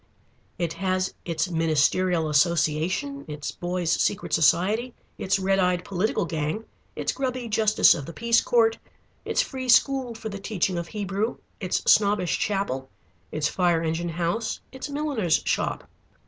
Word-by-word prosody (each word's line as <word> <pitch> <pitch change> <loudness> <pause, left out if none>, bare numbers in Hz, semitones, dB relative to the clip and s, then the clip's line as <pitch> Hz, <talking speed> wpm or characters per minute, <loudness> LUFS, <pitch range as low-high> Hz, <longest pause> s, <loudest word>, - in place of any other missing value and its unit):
It 170 -2 -2
has 185 -1 -1
its 170 +2 -1
Ministerial 165 +1 +2
Association, 170 - +1
its 150 -1 -5
boys' 175 -1 -2
secret 200 - 0
society, 200 - +2 0.2
its 190 +1 +1
red 195 0 +1
eyed 180 -1 +1
political 195 0 0
gang, 160 +7 -3 0.3
its - - -1
grubby 255 -2 -3
Justice 215 -1 +4
of 145 -4 -6
the - - -6
Peace 230 +5 +2
court, 225 -2 +2 0.5
its - - +1
free 260 -2 -6
school 260 -1 +3
for 220 0 -6
the 200 -1 -6
teaching 195 -3 -1
of 170 - -5
Hebrew, 205 +2 -2 0.2
its 185 -3 -1
snobbish 205 -4 +3
chapel, 165 -11 -2 0.4
its 150 -1 0
fire 175 -3 +1
engine 165 +2 -1
house, 170 +7 -2
its 265 +2 -7
milliner's 285 - 0
shop. - - -1
185 Hz, 145 wpm, -25 LUFS, 165-225 Hz, 0.5 s, Justice